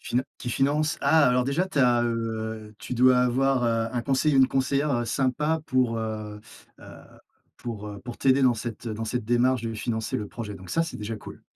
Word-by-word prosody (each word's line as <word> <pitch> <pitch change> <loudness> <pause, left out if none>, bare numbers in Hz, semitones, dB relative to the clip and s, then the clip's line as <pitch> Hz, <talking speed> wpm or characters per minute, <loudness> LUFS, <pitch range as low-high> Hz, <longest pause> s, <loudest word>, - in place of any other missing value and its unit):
Finan 125 +2 -1 0.2
qui 125 - -4
finance. 150 +5 +1
Ah 150 +1 +5
alors 125 0 +2
déjà, 145 +8 0
tu 190 -6 -4
as, 120 -2 +4
heu, 110 -2 -3
tu 120 - -6
dois 125 +1 +5
avoir, 125 +1 +2
heu, 115 -1 +1
un 120 - -1
conseiller 140 +3 +1
ou - - +5
une 130 - +6
conseillère 140 +2 0
heu, 120 -1 0
sympa 140 +7 0
pour, 125 -3 +1
heu-heu, 110 -1 -5 1.2
pour 110 -3 -6
heu, 100 -1 -8
pour 120 -1 -8
t'aider 135 0 +3
dans 125 -2 +4
cette 115 +1 -6
dans 110 0 -4
cette 120 +1 -3
démarche 120 +1 +2
de 115 -1 -3
financer 110 0 -2
le 105 - -4
projet. 110 -4 -6
Donc 95 -2 -11
ça, 165 - +2
c'est 165 - -5
déjà 110 +1 -5
cool.. - - -11
120 Hz, 210 wpm, -26 LUFS, 110-135 Hz, 1.2 s, une